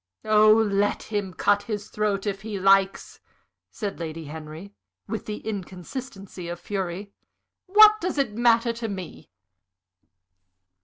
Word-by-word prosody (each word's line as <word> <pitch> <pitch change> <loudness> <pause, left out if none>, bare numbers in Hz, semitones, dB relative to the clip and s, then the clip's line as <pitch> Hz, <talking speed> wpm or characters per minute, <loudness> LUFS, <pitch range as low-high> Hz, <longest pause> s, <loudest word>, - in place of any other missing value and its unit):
"Oh, 215 0 +6
let 205 -2 +2
him 205 -3 -3
cut 205 +3 +2
his 205 -1 -5
throat 210 -2 -1
if 195 -1 -3
he 210 -2 -5
likes!" 195 0 +2 0.5
said 205 -4 -5
Lady 165 -1 -6
Henry, 155 +6 -9 0.3
with 220 - -5
the 210 0 -6
inconsistency 195 - -7
of 175 0 -5
fury. 195 +1 -5 0.5
"What 425 +2 +7
does 360 -2 -2
it 275 -7 0
matter 235 +1 +3
to 230 0 -5
me?" 190 -5 -8
205 Hz, 125 wpm, -25 LUFS, 190-220 Hz, 0.5 s, What